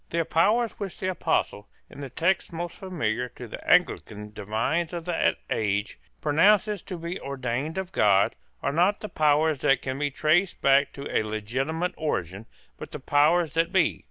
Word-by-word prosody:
The 165 0 0
powers 220 +9 +2
which 200 -3 -6
the 185 0 -1
Apostle, 160 - -1 0.2
in - - -13
the 140 -2 -6
text 175 +9 0
most 170 0 -5
familiar 125 - -2
to - - -8
the - - -9
Anglican 105 0 +1
divines 125 - -1
of 170 -1 -5
that 175 -2 +1
age, 105 -1 -1 0.2
pronounces 200 +6 +3
to 180 - -7
be 170 +2 -5
ordained 135 +3 -3
of 190 -1 -4
God, 100 - +3 0.3
are - - +1
not 180 +6 +2
the 215 - -5
powers 150 0 +2
that 135 - +2
can 130 0 -3
be 145 -1 0
traced 160 +7 +1
back 140 +1 +4
to 140 - -7
a - - +4
legitimate 130 - -2
origin, 100 - -3 0.3
but - - -9
the - - -5
powers 155 +3 +3
that 165 +1 +1
be. 185 -5 +2
155 Hz, 175 wpm, -26 LUFS, 125-175 Hz, 0.3 s, back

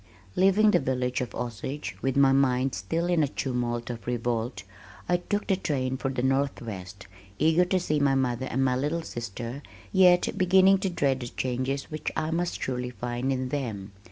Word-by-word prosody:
Leaving 195 +3 +5
the - - +4
village 125 -2 -1
of 125 - -5
Osage, 125 +5 -4
with 135 0 0
my 135 -1 +6
mind 135 -1 +2
still 100 - -2
in 175 -2 +2
a 145 - +3
tumult 120 -3 -2
of 115 -1 -9
revolt, 120 -3 -2 0.4
I 175 - +3
took 205 +4 -2
the 195 - +2
train 130 -8 -1
for 135 +1 -2
the 130 -2 -2
Northwest, 115 -8 -2 0.3
eager 160 +4 +4
to 185 +1 +1
see 155 -4 0
my 140 -1 +3
mother 130 -1 0
and 135 +3 0
my 130 -1 +2
little 150 +6 -1
sister, 120 +1 -6 0.3
yet 180 -2 +5
beginning 190 +1 +5
to 190 - -1
dread 140 -6 +1
the 120 - -5
changes 130 +4 -3
which 155 - -3
I 155 0 -1
must 175 +1 -1
surely 125 -1 -2
find 120 +3 -3
in 130 -1 -1
them. 110 -8 -4
130 Hz, 185 wpm, -27 LUFS, 125-160 Hz, 0.4 s, my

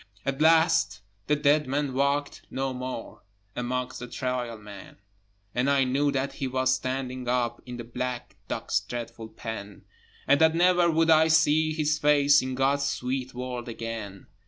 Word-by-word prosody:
At 135 +1 -2
last 160 - +4 0.3
the 150 - +3
dead 150 0 +2
man 140 0 -1
walked 140 +2 0
no 135 0 -2
more 125 -2 -6 0.3
Amongst 125 +1 -3
the 125 - -7
Trial 125 -2 -3
Men, 105 -2 -12 0.6
And 125 +3 +1
I 140 -1 +4
knew 140 +3 +1
that 135 0 -2
he 135 - -3
was 130 0 +1
standing 130 -1 -3
up 120 -1 0
In 125 -1 -6
the 120 - -6
black 125 +1 -5
dock's - - -1
dreadful 115 -1 -7
pen, 105 -3 -8 0.4
And 140 +2 +4
that 160 0 +5
never 175 0 +4
would 165 0 +3
I 160 0 +6
see 155 0 +3
his 150 -1 0
face 145 -1 +5
In 130 0 -4
God's 140 +2 +1
sweet 130 -1 -3
world 125 -1 -5
again. 115 -4 -6
130 Hz, 160 wpm, -27 LUFS, 125-145 Hz, 0.6 s, I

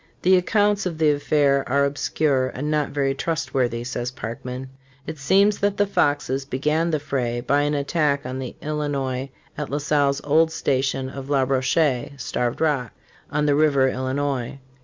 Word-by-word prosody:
"The 185 +1 +6
accounts 205 +1 +2
of 170 -3 -5
the 155 -1 +4
affair 145 -1 +2
are 140 +2 +3
obscure 140 -1 0
and 145 +4 -4
not 150 -1 +1
very 140 -1 0
trustworthy," 130 -6 -1
says 120 -1 -3
Parkman.f 125 +2 -6 0.5
''It - - -19
seems 200 +8 +3
that 200 0 0
the 205 - +3
Foxes 145 -7 0
began 150 +5 0
the 155 -2 0
fray 130 -5 -2
by 140 +4 +1
an 145 +1 0
attack 145 -1 0
on 130 +1 -4
the 130 -2 -6
Illinois 140 -3 -2 0.3
at - - -3
La 145 - -1
Salle's 145 -1 +1
old 160 +2 +3
station 135 -3 0
of 135 +1 -8
La 140 -2 +3
Rocher 130 0 +1
[Starved 120 0 -2
Rock], 140 -7 0 0.4
on 150 0 0
the 145 - +3
river 140 -3 +3
Illinois. 130 0 -2
140 Hz, 165 wpm, -23 LUFS, 130-150 Hz, 0.5 s, The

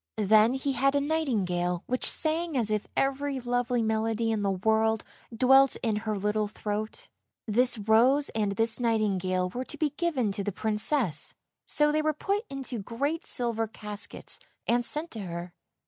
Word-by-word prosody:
Then 215 +3 +5
he 270 +1 -1
had 275 +1 +2
a - - +4
nightingale 200 - -1
which 255 +1 0
sang 320 -1 0
as 220 -3 +1
if 210 -1 -1
every 275 0 0
lovely 245 -1 0
melody 225 +1 0
in 220 -2 -1
the 200 - +1
world 220 +3 +1 0.3
dwelt 265 +3 +5
in 225 -3 +1
her 215 -1 -2
little 210 +1 0
throat. 210 +1 -5 0.4
This 240 +2 +2
rose 235 +7 +3
and 210 -2 -1
this 225 +4 0
nightingale 190 -6 0
were 250 +5 -4
to - - -8
be 305 -2 0
given 290 - 0
to 200 0 -3
the 205 - -2
Princess, 210 - 0 0.3
so 295 0 +3
they 310 +1 +1
were 310 0 +1
put 400 +8 -2
into 270 -3 -4
great 280 - -3
silver 230 -2 0
caskets 210 -1 -4 0.3
and 240 +1 +2
sent 305 +7 +1
to 225 - -6
her. 175 -2 -6
225 Hz, 165 wpm, -28 LUFS, 210-270 Hz, 0.4 s, Then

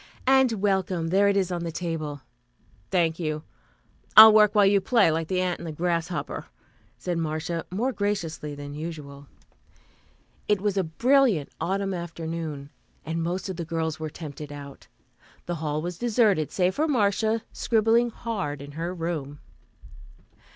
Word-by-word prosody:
"And 265 -2 +4
welcome. 190 -5 0
There 195 +3 +4
it 200 0 +2
is 190 -2 0
on 175 -1 -2
the 165 - -3
table." 155 -4 -4 0.7
"Thank 165 0 +1
you. 155 -2 -3 0.7
I'll 220 0 +12
work 210 0 +5
while 205 -1 +6
you 200 0 +4
play, 205 -4 +4
like 160 0 -1
the 185 0 0
ant 180 -1 -1
and 170 - -7
the - - -4
grasshopper," 170 +2 -2 0.5
said 175 -2 -3
Marcia 160 +1 -3
more 230 +8 -1
graciously 170 -8 -3
than 145 0 -8
usual. 145 -3 -7 1.2
It 210 -1 +2
was 205 0 -1
a 195 - +2
brilliant 235 - +2
autumn 195 +1 -1
afternoon, 165 -4 -5 0.3
and 165 +1 -2
most 175 +4 -2
of 190 -3 -5
the 170 - -3
girls 160 -1 -3
were 155 0 -4
tempted 150 -2 -8
out. 140 -1 -10 0.6
The 175 -1 -3
hall 150 0 -2
was 175 0 -5
deserted, 215 - +2
save 185 0 +1
for 310 +2 0
Marcia, 220 -3 +1
scribbling 230 +1 +2
hard 200 - -4
in 145 +1 -9
her 170 +4 -4
room. 160 -4 -4
175 Hz, 155 wpm, -26 LUFS, 155-200 Hz, 1.2 s, I'll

